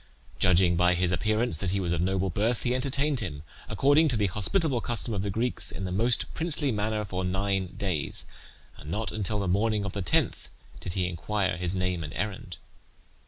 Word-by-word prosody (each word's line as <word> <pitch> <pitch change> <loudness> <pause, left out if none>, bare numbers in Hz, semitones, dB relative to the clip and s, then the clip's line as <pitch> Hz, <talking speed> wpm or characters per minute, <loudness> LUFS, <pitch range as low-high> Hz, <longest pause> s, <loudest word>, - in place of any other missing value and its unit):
Judging 90 -1 +4
by 90 +1 +4
his 90 0 +1
appearance 110 -2 0
that 95 - -1
he 100 +2 0
was 90 -3 -1
of 85 -1 0
noble 95 +1 0
birth, 110 +6 0
he 125 - +1
entertained 140 +2 0
him, 80 -9 -4 0.3
according 145 +4 +4
to 125 -6 +1
the 105 - +2
hospitable 120 - 0
custom 120 0 -1
of 100 - -1
the 100 - -2
Greeks, 115 +5 0
in 95 - -4
the 90 - -3
most 115 +6 +1
princely 160 -4 +1
manner 105 0 -1
for 95 -1 -3
nine 95 0 -1
days, 90 -7 -1 0.5
and 75 - -10
not 110 +6 -2
until 105 0 -1
the 100 - -1
morning 105 +3 +1
of 100 - -4
the 100 - -3
tenth 90 - +1 0.3
did 90 - -5
he 90 -1 0
inquire 95 +2 -1
his 90 +1 -1
name 90 -2 -1
and 75 - -7
errand. 95 -5 -4
100 Hz, 200 wpm, -27 LUFS, 90-115 Hz, 0.5 s, Judging